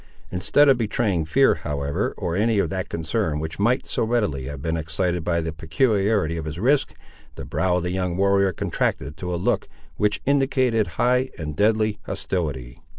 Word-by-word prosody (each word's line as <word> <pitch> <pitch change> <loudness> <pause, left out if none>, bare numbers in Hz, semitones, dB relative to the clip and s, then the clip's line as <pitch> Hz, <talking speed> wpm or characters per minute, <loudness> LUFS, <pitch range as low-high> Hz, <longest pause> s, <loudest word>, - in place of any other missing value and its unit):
Instead 120 +11 +3
of 135 -3 +5
betraying 105 -6 0
fear, 135 - +4
however, 70 -1 -2
or 85 -1 -2
any 110 +2 +2
of 100 - +1
that 95 -1 -3
concern 80 0 -1
which 80 +3 -5
might 120 +6 +2
so - - -1
readily 105 - 0
have 70 0 -6
been 80 +3 -2
excited 85 +2 -1
by 85 0 +1
the 80 -1 -4
peculiarity 95 - +1
of 80 - -4
his 75 +1 -5
risk, 130 +9 +1 0.4
the - - -7
brow 95 -1 0
of 90 - -2
the 90 - -2
young 90 -1 -1
warrior 100 0 +3
contracted 70 -4 -2
to 90 +1 -5
a 90 - -1
look 85 - 0 0.3
which 105 0 +1
indicated 130 -5 +2
high 125 +1 +2
and 75 -2 -5
deadly 110 +2 +2
hostility. 75 -10 -3
95 Hz, 180 wpm, -23 LUFS, 80-110 Hz, 0.4 s, of